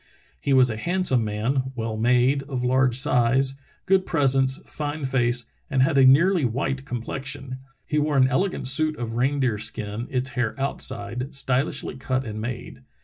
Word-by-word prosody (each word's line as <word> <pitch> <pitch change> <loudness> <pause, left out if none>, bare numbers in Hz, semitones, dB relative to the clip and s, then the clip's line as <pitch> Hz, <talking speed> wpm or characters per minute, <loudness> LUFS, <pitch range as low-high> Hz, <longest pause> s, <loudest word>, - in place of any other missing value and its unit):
"He 140 - -2
was 130 -2 +5
a 110 - -5
handsome 170 -4 +1
man, 125 +5 -2
well 115 -2 -3
made, 125 +4 +2
of 130 -3 -3
large 130 -1 +2
size, 130 +2 +2 0.2
good 190 0 +3
pres 145 -7 +2
ence, 135 0 +2
fine 150 -1 -4
face, 120 -2 +1 0.2
and 135 -3 +2
had 135 - +1
a - - +6
nearly 165 +6 +5
white 135 +3 -2
complexion. 130 +1 -5 0.3
He 150 - 0
wore 150 -1 0
an 130 -1 +5
elegant 155 +3 -1
suit 155 +3 +3
of 115 -2 -4
reindeer 130 -2 0
skin, 110 +1 -5
its 130 0 -1
hair 125 0 -3
outside, 125 -2 -3
stylishl)^ 135 0 -1
cut 130 0 -2
and 110 -1 -5
made. 120 +1 -6
130 Hz, 165 wpm, -24 LUFS, 120-140 Hz, 0.3 s, a